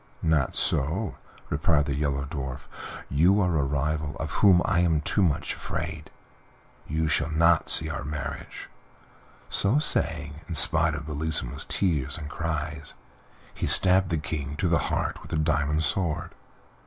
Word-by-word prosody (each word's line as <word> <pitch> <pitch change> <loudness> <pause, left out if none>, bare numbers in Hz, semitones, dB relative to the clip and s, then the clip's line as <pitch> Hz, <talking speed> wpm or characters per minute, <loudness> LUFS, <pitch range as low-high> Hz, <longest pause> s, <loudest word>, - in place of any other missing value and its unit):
"Not 80 -5 +1
so," 80 +9 -1 0.3
replied 75 0 +2
the 70 - -2
Yellow 70 -1 -1
Dwarf; 70 -4 -5 0.5
"you 85 +9 +3
are 90 -4 +1
a 75 - +2
rival 75 +2 -2
of 80 - -4
whom 95 -4 +4
I 90 - +1
am 80 -3 +2
too 100 - 0
much 85 -7 0
afraid; 80 0 -5 0.8
you 80 +1 -1
shall 75 0 +1
not 80 +1 +3
see 80 - +6
our 75 - -4
marriage." 75 -1 -6 0.8
So 100 +8 +2
saying, 80 - +1
in 85 - -3
spite 80 +2 +3
of 75 0 -6
Bellissima's 75 -4 -2
tears 75 -6 -1
and 75 -2 -8
cries, 75 -2 -4 0.6
he - - -3
stabbed 95 0 +5
the 85 - 0
King 75 -1 -4
to 90 - -1
the 85 0 +2
heart - - -2
with - - -13
the - - -2
diamond 75 0 +1
sword. 85 -1 -2
80 Hz, 155 wpm, -26 LUFS, 75-85 Hz, 0.8 s, see